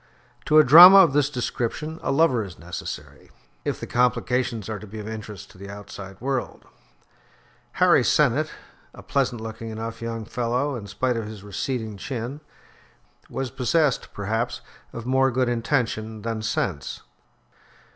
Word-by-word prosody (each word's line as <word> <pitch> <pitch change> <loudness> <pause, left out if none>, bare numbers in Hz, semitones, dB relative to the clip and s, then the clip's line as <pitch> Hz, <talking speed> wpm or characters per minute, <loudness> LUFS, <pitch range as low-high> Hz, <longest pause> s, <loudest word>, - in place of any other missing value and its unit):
To 155 - +4
a 155 - +9
drama 175 +8 +10
of 175 -8 +7
this 145 -1 +2
description, 145 +4 -3
a - - -1
lover 135 -6 +3
is 95 -3 -10
necessary, 85 +2 -8 0.3
if - - -2
the - - -5
complications 125 -2 0
are 110 -2 -4
to 110 - -11
be 110 +3 -9
of 105 0 -7
interest 110 -2 -8
to - - -18
the 100 0 -9
outside 100 -1 -9
world. 130 0 -3 1.1
Harry - - +4
Sennett, - - +2 0.5
a - - -12
pleasant 130 -4 -1
looking 115 0 -7
enough 115 +1 -6
young 115 -1 -4
fellow, 125 +5 -1
in 105 -4 -7
spite 125 +4 -1
of 110 -2 -4
his 105 -2 -9
receding 110 +1 -4
chin, 130 +5 -5 0.9
was 135 -2 -4
possessed, 140 +2 +1
perhaps, 110 +4 -2 0.3
of 115 - -7
more 130 +1 +3
good 130 0 0
intention 115 -3 -1
than 115 -1 -3
sense. 90 -9 -3
115 Hz, 150 wpm, -24 LUFS, 110-130 Hz, 1.1 s, drama